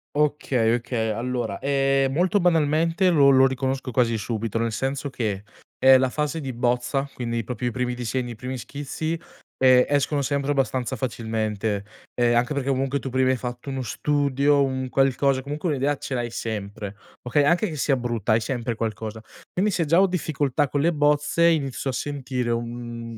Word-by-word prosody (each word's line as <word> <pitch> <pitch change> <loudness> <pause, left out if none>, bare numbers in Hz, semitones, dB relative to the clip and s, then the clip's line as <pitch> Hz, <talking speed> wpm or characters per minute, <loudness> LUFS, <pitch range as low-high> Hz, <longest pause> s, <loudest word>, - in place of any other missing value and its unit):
Okay, 135 -6 +1
okay 120 -2 -2
allora, 120 -3 -2
ehm, 135 -1 +2
molto 180 +6 +2
banalmente 165 +2 +2
lo 145 -5 +5
lo 135 0 +6
riconosco 130 0 -2
quasi 115 -2 +2
subito, 115 +1 -3
nel 115 -1 -1
senso 135 +3 -2
che 105 -6 -3 0.4
è 130 0 +8
la 130 0 +1
fase 150 +3 -2
di 135 -2 -4
bozza 125 +3 0
quindi, 115 -3 -3
proprio, 125 0 -4
i - - -1
primi 125 0 -2
disegni, 120 0 -3
i - - -7
primi 125 +3 -5
schizzi, 145 +5 -4 0.4
ehm, 130 -1 +6
escono 145 0 +1
sempre 140 +1 -1
abbastanza 130 -3 -1
facilmente, 110 -4 -2 0.3
eh, 120 -1 +2
anche 120 +4 +2
perché 140 -1 -3
comunque, 135 +1 0
tu 135 - -5
prima 130 0 +2
hai 130 - +2
fatto 125 +2 -6
uno 135 -1 -3
studio, 145 +1 +1
un 130 -1 -3
qualcosa, 135 +1 +2
comunque 150 +5 -3
un'idea 145 0 +1
ce 135 - -6
l'hai 120 -1 -1
sempre, 105 -3 -5 0.3
okay, 140 +4 +2
anche 175 +7 +2
che 155 - -6
sia 135 0 +2
brutta, 120 -3 -1
hai 115 - +3
sempre 120 -1 -2
qualcosa. 110 0 -4 0.3
Quindi, 200 +3 +1
se 170 -3 0
già 165 +5 +4
ho 195 - +5
difficoltà 150 -5 0
con 145 +1 -1
le 170 +2 +3
bozze, 150 +2 +2
inizio 140 -5 0
a - - -2
sentire 130 -3 -3
un 115 0 -5
130 Hz, 180 wpm, -24 LUFS, 120-145 Hz, 0.4 s, è